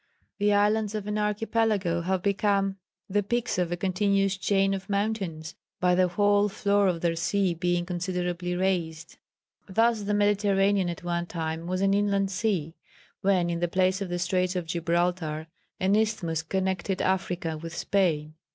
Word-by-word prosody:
The 205 0 +3
islands 210 +1 +2
of 210 -2 -3
an 210 0 -2
archipelago 210 -4 0
have 185 +1 -1
become 200 -1 +1 0.3
the 205 +1 +1
peaks 235 0 -1
of 175 -1 0
a 175 - -1
continuous 195 +1 +1
chain 195 +1 +1
of 195 0 -5
mountains 200 -6 -2 0.3
by 180 0 +3
the 185 0 +4
whole 205 +3 +2
floor 200 0 +2
of 170 -3 0
their 170 -1 +1
sea 180 +2 +1
being 175 +1 0
considerably 180 0 -2
raised. 170 -3 -2 0.5
"Thus 225 +3 +2
the 205 0 -1
Mediterranean 200 -2 +2
at 170 - -6
one 175 0 -2
time 160 0 -4
was 185 +1 -1
an 195 0 +3
inland 200 -1 +1
sea, 180 -6 -1 0.5
when 185 -3 +2
in 170 - -2
the 175 - +1
place 185 +2 +1
of 195 - -3
the 175 - -2
Straits 180 +1 0
of 180 -2 -2
Gibraltar, 170 -1 -1 0.3
an 190 +2 +2
isthmus 210 -7 0
connected 190 +2 -2
Africa 180 -3 -1
with 165 +2 -7
Spain. 160 -6 0
190 Hz, 160 wpm, -27 LUFS, 175-200 Hz, 0.5 s, the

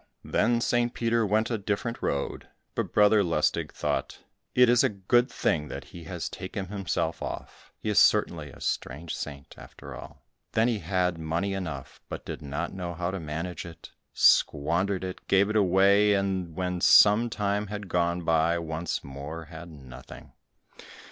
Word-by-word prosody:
Then 120 0 +1
St. 120 0 +1
Peter 115 -1 +1
went 110 +4 +1
a 115 - -1
different 105 +4 -3
road, 70 -1 -2 0.3
but - - -2
Brother 105 0 +5
Lustig 85 -3 0
thought, - - -2 0.4
"It 125 0 +6
is 120 0 +5
a - - +3
good 115 +6 +2
thing 75 -2 0
that - - -7
he 85 -2 -12
has 85 0 -4
taken 95 0 -6
himself 90 -5 -2
off, - - -7
he - - -8
is 105 -4 +4
certainly 85 -8 +3
a - - -14
strange 80 +5 -3
saint, 70 -1 -7
after - - -11
all." - - -11 0.3
Then 110 +2 +3
he 115 -3 0
had 90 -1 0
money 85 +5 -1
enough, 80 -9 -6
but - - -6
did - - -6
not 75 +5 -4
know 90 -2 -5
how 90 +2 -2
to 95 - -4
manage 80 +3 -5
it, 85 -1 -11 0.2
squandered 90 +6 +3
it, 95 -1 -7
gave 100 +2 +3
it - - -3
away, 100 +1 +4
and 95 -2 -1
and 80 - -15
when 90 -1 -2
some 110 +6 +6
time 105 -1 -1
had 105 0 -6
gone 85 0 0
by, 80 +1 +2
once 80 0 -3
more 70 +4 -7
had 85 +2 -9
nothing. 65 -5 -12
90 Hz, 170 wpm, -27 LUFS, 80-105 Hz, 0.4 s, It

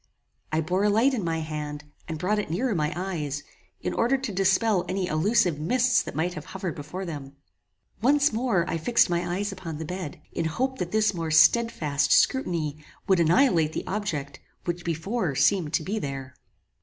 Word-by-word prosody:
I 155 +1 +1
bore 180 +5 0
a 210 - +4
light 230 +7 +3
in 225 -6 -1
my 165 -1 -1
hand, 150 -1 -5 0.2
and 160 - -4
brought 195 +6 0
it 210 - -4
nearer 220 +9 0
my 155 -4 0
eyes, 155 -6 -3 0.4
in - - -2
order 245 +4 +2
to 260 -4 -4
dispel 195 +1 +2
any 185 0 -1
illusive 180 -1 +2
mists 250 +9 +3
that - - -7
might 170 +4 0
have 155 -3 -7
hovered 190 -3 -4
before 155 +6 -6
them. 140 -5 -7 0.7
Once 280 +2 +4
more 220 -7 +1
I 165 - -2
fixed 230 +2 +3
my 175 0 0
eyes 205 +1 -2
upon 175 -5 -6
the 160 - -5
bed, 180 -2 -6
in - - -2
hope 260 +11 -1
that 175 -1 -3
this 215 -1 +2
more 165 -2 -3
stedfast 155 -3 +3
scrutiny 160 - +1 0.2
would 190 -3 +4
annihilate 165 - +3
the - - -4
object 160 -9 -3 0.3
which 175 0 -3
before 170 - -2
seemed 155 +3 +2
to 165 - +1
be 205 +6 -2
there. 135 -5 -5
175 Hz, 185 wpm, -26 LUFS, 155-210 Hz, 0.7 s, a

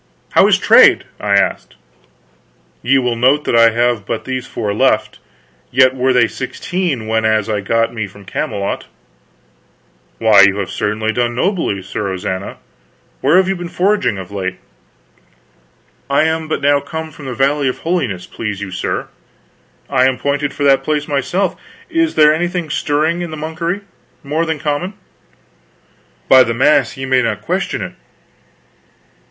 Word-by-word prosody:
"How - - +5
is - - +4
trade?" - - +6 0.2
I - - -1
asked. - - 0 1.1
"Ye 135 +3 +3
will 125 -2 0
note 130 +5 +3
that - - 0
I 115 0 +7
have 120 -1 0
but 110 - -4
these 130 -1 -4
four 105 -3 -3
left; 110 -2 +1 0.5
yet 130 +1 +4
were 130 +1 +1
they 125 -2 +4
sixteen 165 - -3
whenas 110 -1 +1
I 105 -2 -1
got 115 +4 0
me 110 -3 -3
from 100 +1 -15
Camelot." 100 +1 -3 1.3
"Why, 110 -3 +6
you 100 +1 +5
have 100 -2 -3
certainly 110 +1 -1
done 120 0 -1
nobly, 165 - -1
Sir 100 +2 -4
Ozana. 95 +1 -4 0.6
Where 145 +7 +4
have 190 0 +3
you 195 - 0
been 175 -1 -6
foraging 195 - +1
of 95 0 -8
late?" 95 -2 -4 1.5
"I 140 +2 +3
am 160 0 -1
but 155 - -2
now 145 0 +3
come 160 +3 -6
from 145 - -12
the 125 - -5
Valley 140 +2 +1
of 130 - -2
Holiness, 135 - -1
please 105 -3 -5
you 100 -2 -6
sir." 95 - -3 0.8
"I 130 +1 +3
am 130 -1 0
pointed 145 0 -1
for 145 - -5
that 135 -1 +4
place 150 0 -1
myself. 160 +7 -1 0.4
Is 330 -1 +1
there 150 0 +6
anything 175 -1 -2
stirring 155 +5 0
in 175 - -4
the 155 - -7
monkery, 165 +5 -3 0.4
more 155 +4 -1
than 160 -1 -1
common?" 155 +6 -3 1.3
"By 130 - +7
the 115 -2 +1
mass 135 -1 +2
ye 135 - -4
may 130 -1 +2
not 110 -4 -2
question - - -2
it!.... - - -7
130 Hz, 160 wpm, -16 LUFS, 110-155 Hz, 1.5 s, I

